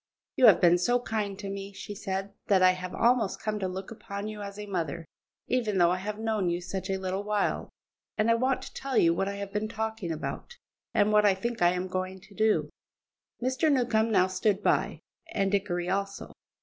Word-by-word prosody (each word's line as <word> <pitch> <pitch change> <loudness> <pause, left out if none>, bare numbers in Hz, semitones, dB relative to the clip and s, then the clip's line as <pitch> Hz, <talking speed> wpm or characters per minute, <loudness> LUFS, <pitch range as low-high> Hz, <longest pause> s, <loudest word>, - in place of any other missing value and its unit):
"You 255 - +6
have 210 - +7
been 175 0 +5
so 245 +7 +2
kind 210 -4 -3
to 205 0 -6
me," 195 0 -6
she 205 - -7
said, 195 -1 -4
"that 190 -2 +4
I 185 - +7
have 185 0 -5
almost 235 -3 +2
come 215 -1 -2
to 190 - -1
look 190 +2 -6
upon 200 -2 -6
you 215 -1 -6
as 200 0 -7
a 210 - -6
mother, 170 -4 -3 0.4
even 230 -5 0
though 175 -1 +5
I 180 - +1
have 210 +2 -4
known 220 -4 0
you 170 0 -1
such 185 +2 -5
a 190 - 0
little 190 +1 -2
while, 210 -1 -1 0.5
and 220 +1 +3
I - - +6
want 255 +3 +1
to - - -10
tell 270 -1 -3
you 165 0 +5
what 195 +3 -1
I 200 - -3
have 200 0 -6
been 210 +1 -1
talking 220 -4 -3
about, 165 - -5 0.3
and 215 -2 +3
what 210 0 +5
I 195 - +4
think 235 +4 -4
I 175 0 +5
am 180 +1 -2
going 185 +1 -3
to 200 - -17
do." 215 +1 +1 0.7
Mr. 260 +5 +2
Newcombe 235 -4 +2
now 185 -3 +5
stood 195 +2 0
by, - - +1 0.3
and 195 -2 +1
Dickory 180 -3 0
also. 195 +1 -2
200 Hz, 215 wpm, -28 LUFS, 185-220 Hz, 0.7 s, have